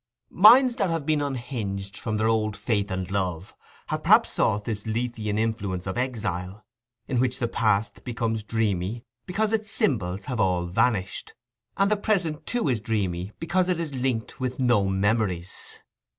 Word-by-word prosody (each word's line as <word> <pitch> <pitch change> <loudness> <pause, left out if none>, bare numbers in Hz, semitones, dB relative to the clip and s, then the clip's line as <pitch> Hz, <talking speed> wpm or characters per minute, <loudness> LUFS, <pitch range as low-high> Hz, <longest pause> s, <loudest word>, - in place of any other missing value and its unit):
Minds 240 +6 +7
that 195 - +1
have 165 -3 -2
been 155 -1 +1
unhinged 110 -8 -4
from 110 0 -3
their 110 +1 +1
old 110 -1 +1
faith 105 -1 -1
and 95 -1 -3
love, 95 -2 -2 0.4
have - - -2
perhaps - - +5
sought 105 +1 +1
this 105 -1 -4
Lethean 110 -2 -2
influence 105 -5 -2
of 95 - -3
exile, 105 -6 -3 0.4
in 130 -4 0
which 130 0 +1
the 120 -3 -1
past 110 -2 0
becomes 115 -2 -2
dreamy 105 0 -1 0.2
because 215 +4 0
its 215 -1 -1
symbols 105 - 0
have 125 -3 -3
all 90 -4 +2
vanished, 105 +1 -1 0.4
and 195 +1 +3
the 215 - +3
present 180 -8 -1
too 245 -7 0
is 125 -5 +1
dreamy 100 -5 -2
because 185 +2 +1
it 180 -2 +1
is 160 -4 -3
linked 125 -2 -2
with 130 0 -3
no 120 -6 +3
memories. 95 -2 -1
115 Hz, 165 wpm, -25 LUFS, 100-135 Hz, 0.4 s, Minds